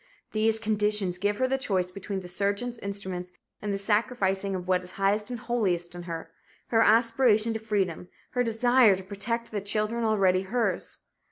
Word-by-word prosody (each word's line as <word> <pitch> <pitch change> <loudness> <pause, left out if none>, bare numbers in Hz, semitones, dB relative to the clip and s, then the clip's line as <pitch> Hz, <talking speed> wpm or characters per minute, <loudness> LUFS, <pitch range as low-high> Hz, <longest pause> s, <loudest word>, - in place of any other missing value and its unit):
These 220 +1 +2
conditions 210 -4 0
give 205 +1 0
her 260 - +2
the 270 +1 0
choice 185 -7 -1
between 195 +1 -5
the 180 - -9
surgeon's 200 +6 -1
instruments 190 -3 -4 0.3
and 210 - -2
the 200 - 0
sacrificing 200 -2 0
of 180 -1 -5
what 185 -1 +2
is 180 - -9
highest 205 +2 +1
and 245 - -4
holiest 200 -8 -1
in 175 - -7
her 165 0 -6 0.4
her 225 -1 +4
aspiration 230 0 +4
to 220 - -3
freedom, 195 -6 -1 0.2
her 245 - +1
desire 235 -1 +4
to 190 - -7
protect 220 +5 -4
the 205 -2 -2
children 215 +3 -1
already 195 -4 +3
hers. 200 -2 -2
205 Hz, 175 wpm, -27 LUFS, 190-225 Hz, 0.4 s, her